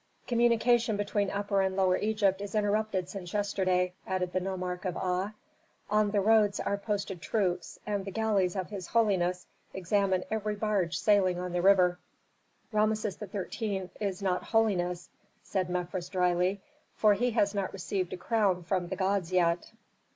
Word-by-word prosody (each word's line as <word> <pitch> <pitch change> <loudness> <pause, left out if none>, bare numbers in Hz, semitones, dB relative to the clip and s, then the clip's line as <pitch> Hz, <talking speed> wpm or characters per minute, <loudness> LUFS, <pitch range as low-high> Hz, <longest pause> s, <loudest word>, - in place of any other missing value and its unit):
"Communication 235 -1 +3
between 205 -1 0
Upper 200 0 0
and 190 0 0
Lower 190 -1 +3
Egypt 200 -2 +1
is 205 +1 -6
interrupted 210 -3 0
since 180 -2 -7
yesterday," 185 -3 +1
added 185 -1 -2
the 185 - +2
nomarch 185 -1 -4
of 180 -2 -2
Aa. 185 +3 -1 0.6
"On 210 0 +3
the 205 -1 +1
roads 210 -1 +4
are 200 - 0
posted 200 -3 -3
troops, 180 -1 -1
and 205 -2 -2
the 195 - -5
galleys 200 -3 +1
of 190 0 -4
his 190 -4 -6
holiness 185 -6 +1 0.3
examine 190 0 +1
every 215 -1 -1
barge 205 -5 0
sailing 195 -4 +3
on 180 0 -4
the 175 - +1
river." 180 -2 +4 0.7
"Rameses 215 -1 0
XIII. 200 -1 -4
is 200 -2 -3
not 180 -2 0
'holiness,'" 180 -6 0 0.3
said 185 -2 -2
Mefres, 180 0 -3
dryly, 180 +1 +1 0.3
"for 215 -1 +5
he 245 +5 +1
has 210 -3 +1
not 200 -2 -2
received 185 -1 -3
a - - -4
crown 195 -4 +1
from 180 0 -1
the 190 - -3
gods 190 -2 0
yet." 175 -1 +1
195 Hz, 160 wpm, -30 LUFS, 180-210 Hz, 0.7 s, for